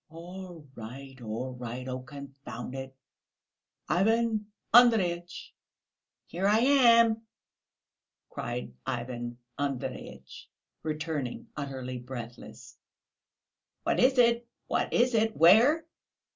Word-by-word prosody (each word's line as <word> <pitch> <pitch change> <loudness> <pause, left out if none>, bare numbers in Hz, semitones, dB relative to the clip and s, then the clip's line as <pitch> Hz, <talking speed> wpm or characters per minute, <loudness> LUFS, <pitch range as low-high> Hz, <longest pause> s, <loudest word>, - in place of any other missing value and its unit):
"All 175 -1 -10
right, 130 +3 -10
all 120 +3 -4
right. 125 +1 -6
Oh, 130 0 -3
confound 140 -1 -9
it! 135 0 -7 0.9
Ivan 215 +5 +2 0.3
Andreyitch!" 185 -8 +4 0.7
"Here 185 +3 -1
I 210 +1 +5
am," 235 -3 +5 1.1
cried 120 - -5
Ivan 120 -1 -4 0.2
Andreyitch, 140 -3 -5 0.3
returning, 155 -4 -4
utterly 130 -3 -5
breathless. 120 -1 -9 1.0
"What - - +1
is 260 +1 +4
it, 235 -1 +4 0.2
what - - -1
is 250 +1 +3
it? 225 0 +1
Where?" 235 - +6
155 Hz, 90 wpm, -29 LUFS, -, 1.1 s, Where